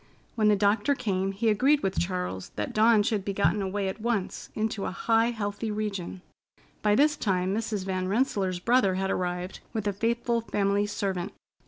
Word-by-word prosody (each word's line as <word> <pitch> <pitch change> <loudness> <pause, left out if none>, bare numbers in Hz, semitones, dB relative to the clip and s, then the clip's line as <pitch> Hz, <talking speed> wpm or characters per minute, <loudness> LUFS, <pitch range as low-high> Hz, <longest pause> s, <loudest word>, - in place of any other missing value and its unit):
When 215 -2 +2
the 210 - +5
doctor 205 +7 +2
came 195 -6 -1
he 210 +4 -2
agreed 270 +8 +3
with 190 -1 0
Charles 180 - -3
that 105 - -3
Dawn 220 0 +5
should 210 -2 0
be 200 - -3
gotten 190 +3 +2
away 195 +1 -2
at 190 +3 -5
once 220 -5 -2
into 215 -2 -2
a - - -1
high, 225 0 +2
healthy 215 -1 -3
region. 200 -4 -4 0.6
By 210 -1 +3
this 300 +4 +4
time 185 -2 0
Mrs. 210 -3 -2
Van 185 -1 -2
Rensselaer's 195 -4 0
brother 200 -1 +2
had 190 +1 -1
arrived 180 0 -3
with 220 -3 -2
a 205 - +1
faithful 235 +3 0
family 205 -2 0
servant. 190 -3 -3
205 Hz, 180 wpm, -27 LUFS, 190-225 Hz, 0.6 s, the